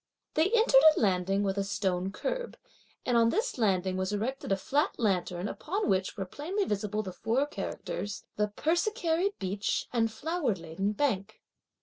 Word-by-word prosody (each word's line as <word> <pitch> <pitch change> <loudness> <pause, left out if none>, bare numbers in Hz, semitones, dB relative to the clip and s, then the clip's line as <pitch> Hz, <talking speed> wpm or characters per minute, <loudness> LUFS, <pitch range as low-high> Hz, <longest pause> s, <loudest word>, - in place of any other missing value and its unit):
They 315 +5 +3
entered 475 +2 +5 0.2
a - - +2
landing 195 -1 +2
with 195 0 0
a - - +1
stone 190 -1 -1
curb; - - -3 0.5
and 245 - +1
on 230 -1 +5
this 440 - -1
landing 190 -4 +1
was 185 +1 -1
erected 225 +4 -2
a 195 - +3
flat 285 - 0
lantern 185 -4 0
upon 390 - -2
which 190 +1 0
were 195 - -2
plainly 350 - -2
visible 210 +1 -1
the 185 -2 -6
four 235 +8 +1
characters 205 -7 -5
the 210 0 +1
"Persicary 345 - 0
beach 195 +2 -1
and 225 -2 +2
flower 300 - -1
laden 170 +4 -3
bank." 215 -5 -1
215 Hz, 160 wpm, -30 LUFS, 195-310 Hz, 0.5 s, entered